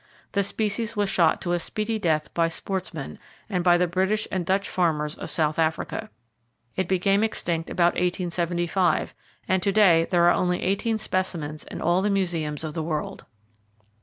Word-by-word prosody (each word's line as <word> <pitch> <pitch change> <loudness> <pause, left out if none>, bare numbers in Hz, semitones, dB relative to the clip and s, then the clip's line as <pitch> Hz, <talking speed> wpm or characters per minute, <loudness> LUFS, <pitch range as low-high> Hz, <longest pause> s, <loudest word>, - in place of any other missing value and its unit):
The 200 - +1
species 215 +3 -2
was 205 -2 0
shot 165 -3 +3
to 175 - -2
a 175 - +1
speedy 215 +5 -2
death 155 -5 0
by 165 -1 +2
sportsmen, 170 -3 -5 0.3
and 180 -4 -1
by 175 -1 +5
the 180 - +3
British 190 +5 0
and 185 -2 -1
Dutch 195 +3 0
farmers 150 -4 0
of - - -7
South 155 -1 0
Africa. 165 +7 -1 0.7
It 190 -2 -1
became 195 +3 +2
extinct 170 -6 -1
about 175 -1 +2
1875, 175 0 0 0.3
and 190 -1 +2
to 200 - +1
day 180 -6 +5
there 175 -2 +3
are 175 - +6
only 180 0 0
18 210 +4 0
specimens 175 -7 -3
in - - -7
all 175 +2 +3
the 205 - +1
museums 170 -6 0
of 155 -1 -4
the 160 - -2
world. 155 -1 -4
180 Hz, 170 wpm, -25 LUFS, 165-195 Hz, 0.7 s, are